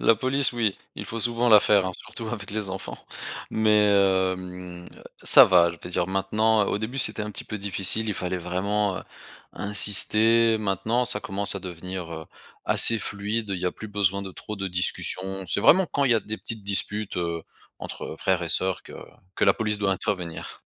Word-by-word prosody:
La 115 - +4
police 130 +4 +2
oui, 115 -5 -1 0.2
il - - -8
faut 115 0 -5
souvent 120 +1 0
la 105 -2 +7
faire, 100 -3 +2
hein. 95 - -4
Surtout 115 -2 -9
avec 105 -3 -7
les 105 -2 -4
enfants. 75 -11 -7 0.5
Mais 105 -1 +2
hem, 95 -2 -1 0.4
ça - - +9
va, 85 -3 +3
je 85 - -11
vais 90 - -9
dire 90 0 -1
maintenant, 105 +3 0
heu, - - -4
au 105 - -2
début 120 +5 -5
c'était 110 -3 +2
un 105 - -6
petit - - -3
peu 105 - -7
difficile, 100 +3 0
il 105 - -2
fallait 90 0 -4
vraiment, 95 +3 -2
heu, - - -9 0.5
insister, 110 +2 +4
maintenant 110 +4 -1
ça 125 - +1
commence 100 +1 -2
à 100 - -5
devenir, 90 -1 -7
heu, 80 -1 -9 0.4
assez 115 -1 +7
fluide, 105 +2 -4
il 95 - -3
y 90 - -3
a - - -2
plus 110 - -10
besoin 100 -1 -1
de 95 - -8
trop 105 +3 -9
de 95 -1 -4
discussions. 95 +1 0
C'est 100 - -2
vraiment 185 - +4
quand 140 - -1
il 125 - +1
y - - +3
a 110 - +1
petites 110 +1 -5
disputes, 100 +1 -1
heu, 85 -2 -3 0.4
entre - - -8
frères 90 -2 -1
et 85 - -5
sœurs 95 +2 -2
que - - -14 0.4
que - - 0
la - - +4
police 105 -2 -2
doit 100 -2 0
intervenir. 90 -4 -5
100 Hz, 200 wpm, -24 LUFS, 95-110 Hz, 0.5 s, ça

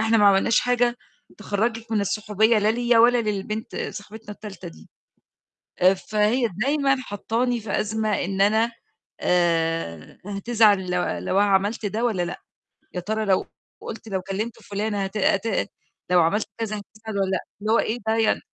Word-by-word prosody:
إحنا 225 +1 +3
ما 205 - +6
عملناش 200 +3 +4
حاجة 245 -1 +1 0.4
تخرجِك 225 +2 -2
من 215 - +2
الصُحوبية 210 +2 +2
لا 210 +1 +2
ليّا 240 0 +2
ولا 240 +1 +6
للبنت 210 +1 -3
صاحبتنا 210 +1 -7
التالتة 205 - -9
دي، 80 -1 -15 0.9
آآ 185 +2 +5
فهي 215 +5 +1
دايمًا 275 0 +2
حاطاني 235 +3 -1
في 210 -2 -1
أزمة 215 0 -1
إن 195 +1 -3
أنا 220 +3 +3 0.5
آآ 165 - 0
هتزعل 205 -2 +2
لو 180 0 +1
لو 195 +2 0
أنا 205 - +3
عملت 205 +3 +1
ده 215 +4 -2
والّا 210 -7 +1
لأ، 175 0 -5 0.5
يا 180 - -2
ترى 220 +4 -2
لو 190 -1 +2 0.3
قُلت 225 - -8
لو 190 -3 -2
كلمت 205 +4 -4
فُلانة 205 0 -2
هت 195 +2 -6
هت 200 +1 +1 0.4
لو 180 -1 +5
عملّت 200 +6 +1
كذا 215 -2 -2
هتزعل 215 0 -8
والّا 195 -1 +1
لأ، 190 - 0 0.2
اللي 215 +2 0
هو 230 - +5
إيه 230 +3 0
ده 220 - +2
يعني 225 -1 +2
210 Hz, 165 wpm, -24 LUFS, 195-225 Hz, 0.9 s, ما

